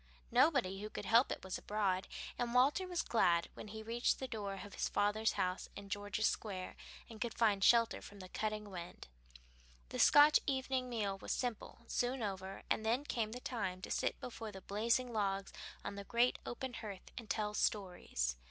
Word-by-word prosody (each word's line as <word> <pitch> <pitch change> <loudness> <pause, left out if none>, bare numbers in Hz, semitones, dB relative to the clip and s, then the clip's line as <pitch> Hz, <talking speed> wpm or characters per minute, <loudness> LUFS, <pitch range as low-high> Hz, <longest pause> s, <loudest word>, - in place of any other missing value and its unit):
Nobody 245 - +3
who 210 - -4
could - - -6
help 235 +3 +5
it - - -4
was 190 -1 -4
abroad, 195 -3 0 0.3
and 240 0 -2
Walter 285 +9 +4
was 355 -2 -1
glad 175 -7 +3
when - - -9
he 220 +1 -7
reached 235 +2 +1
the 265 - -4
door 205 -5 -4
of 205 - -11
his - - -1
father's 210 +2 +2
house 180 0 -1
in 200 0 -8
George's 205 +1 -1
Square 190 -5 -2 0.3
and 220 -2 -11
could 235 - -2
find 205 -4 +3
shelter 230 +1 +5
from 205 - -11
the 185 - -8
cutting 210 +1 -3
wind. 175 -2 -7 0.8
The - - -4
Scotch 295 +1 +8
evening 260 -2 0
meal 205 -5 -1
was - - -4
simple, 240 -2 -3
soon 245 +1 -1
over, 190 -1 -4
and - - +1
then 235 +5 +1
came 225 -6 -1
the 250 - -5
time 200 -8 -3
to - - -5
sit - - 0
before 225 -3 -6
the 190 -1 -9
blazing 235 +5 +1
logs 195 -2 -1 0.3
on - - -3
the 200 0 -6
great 235 +4 +2
open 255 +1 -4
hearth 205 -5 -7
and 230 -3 -8
tell 210 -1 0
stories. 180 - 0
215 Hz, 190 wpm, -36 LUFS, 195-240 Hz, 0.8 s, Scotch